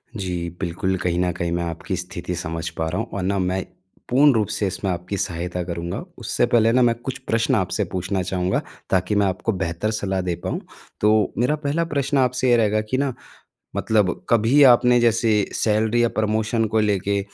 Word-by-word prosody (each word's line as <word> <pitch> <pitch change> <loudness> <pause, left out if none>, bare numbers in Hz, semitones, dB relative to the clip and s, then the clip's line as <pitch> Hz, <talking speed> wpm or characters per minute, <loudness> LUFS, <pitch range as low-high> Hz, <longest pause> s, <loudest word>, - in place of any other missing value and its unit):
जी, 90 -4 -3
बिल्कुल, 95 +1 -1
कहीं 90 -1 -1
न 90 0 +1
कहीं 85 0 -3
मैं 85 0 -1
आपकी 85 +3 -4
स्थिति 90 0 -5
समझ 80 -1 -4
पा 80 0 -1
रहा 90 - -3
हूँ - - -5
और - - -2
ना 100 +1 0
मैं 95 +1 0 0.5
पूर्ण 140 +3 +5
रूप 110 -3 +1
से 100 - -1
इसमें 95 +1 -3
आपकी 90 +3 -4
सहायता 90 +1 -3
करूँगा। 85 +1 -4 0.2
उससे 120 +1 +1
पहले 115 -2 +3
ना 125 +1 +3
मैं 120 -1 +4
कुछ 125 +3 -6
प्रश्न 115 +4 +2
आपसे 100 0 0
पूछना 95 +1 -1
चाहूँगा, 90 0 -1 0.3
ताकि 95 +2 +1
मैं 100 - +3
आपको 95 +4 -1
बेहतर 95 +2 -2
सलाह 95 -3 -1
दे 90 -2 -2
पाऊँ। - - -2 0.4
तो 105 -1 +3
मेरा 125 +6 +2
पहला 150 +2 -1
प्रश्न 140 0 0
आपसे 125 0 +2
ये 120 - +5
रहेगा 110 -1 +2
कि 130 - +2
ना 140 -1 0 0.6
मतलब 105 -4 +1
कभी 115 +6 +4
आपने 125 0 +3
जैसे 115 -3 +3
सैलरी 110 +2 +2
या 120 - +3
प्रमोशन 110 +1 +1
को 110 - +4
लेके 100 -1 +1
105 Hz, 195 wpm, -22 LUFS, 90-115 Hz, 0.6 s, पूर्ण